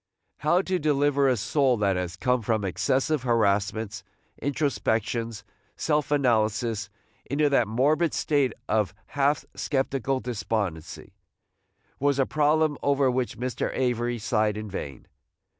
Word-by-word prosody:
How 175 +5 +2
to 185 -1 -1
deliver 145 -2 +2
a 125 - +2
soul 130 +3 +2
that 100 -2 +1
has 90 -1 -3
come 125 +5 +1
from 110 -2 0
excessive 135 - 0
harassments, 105 -2 0 0.4
introspections, 115 -5 -1 0.3
self 150 -3 0
analysis, 115 -5 +1 0.4
into 145 +2 +2
that 130 -5 +3
morbid 150 +9 +2
state 140 -4 +1 0.2
of 105 -3 0 0.2
half 145 +1 +1
sceptical 135 -1 -1
despondency, 100 -9 -4 0.9
was 140 0 +2
a 135 - +3
problem 150 0 +2
over 140 -2 +2
which 125 -1 -2
Mr. 125 0 -2
Avery 120 -1 0
sighed 110 -2 0
in 110 -2 -6
vain. 70 -8 -6
125 Hz, 125 wpm, -26 LUFS, 110-140 Hz, 0.9 s, that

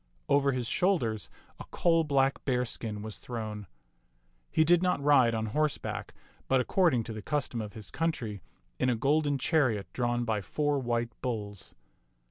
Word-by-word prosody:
Over 140 -1 +3
his 125 -2 -2
shoulders 120 - +1 0.3
a - - -6
coal 165 -1 +2
black 135 -2 +1
bearskin 115 -5 -2
was 110 -1 -7
thrown. 110 -4 -6 0.8
He 160 - +3
did 175 +2 +4
not 180 -4 +1
ride 135 -5 +4
on 110 0 -1
horse 150 +7 0
back, - - -6 0.3
but, 130 - +3
according 130 -3 +2
to 115 - -6
the 110 - -6
custom 135 -2 -2
of 105 -1 -7
his 110 -2 -8
country, 120 - -2 0.4
in - - +2
a 125 - +2
golden 145 +4 +2
chariot 130 - +1
drawn 120 -1 0
by 110 -2 0
four 145 +6 0
white 120 -2 -1
bulls. 105 -6 -5
125 Hz, 160 wpm, -30 LUFS, 110-145 Hz, 0.8 s, did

